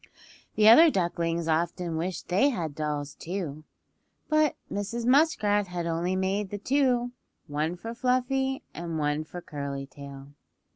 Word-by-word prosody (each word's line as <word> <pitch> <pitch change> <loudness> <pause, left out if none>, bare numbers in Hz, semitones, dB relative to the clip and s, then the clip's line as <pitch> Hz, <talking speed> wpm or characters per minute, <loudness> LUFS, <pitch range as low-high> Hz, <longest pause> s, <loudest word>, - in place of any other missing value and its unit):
The 215 0 +5
other 315 +9 +9
ducklings 170 - -1
often 170 +1 0
wished 170 +2 -3
they 200 +11 +3
had 165 - -3
dolls, 150 -1 -3
too, 160 -4 -5 0.6
but 310 -2 +3 0.2
Mrs. 220 +4 -3
Muskrat 225 -8 +3
had 175 -1 -4
only 170 +2 -1
made 190 +2 -1
the 205 - -4
two, 245 +1 +1 0.3
one 155 +4 -2
for 225 +6 -7
Fluffy, 255 +2 0
and 170 -1 -4
one 150 0 0
for 175 +3 -9
Curly 140 -3 -5
Tail. 140 0 -11
180 Hz, 140 wpm, -27 LUFS, 155-235 Hz, 0.6 s, other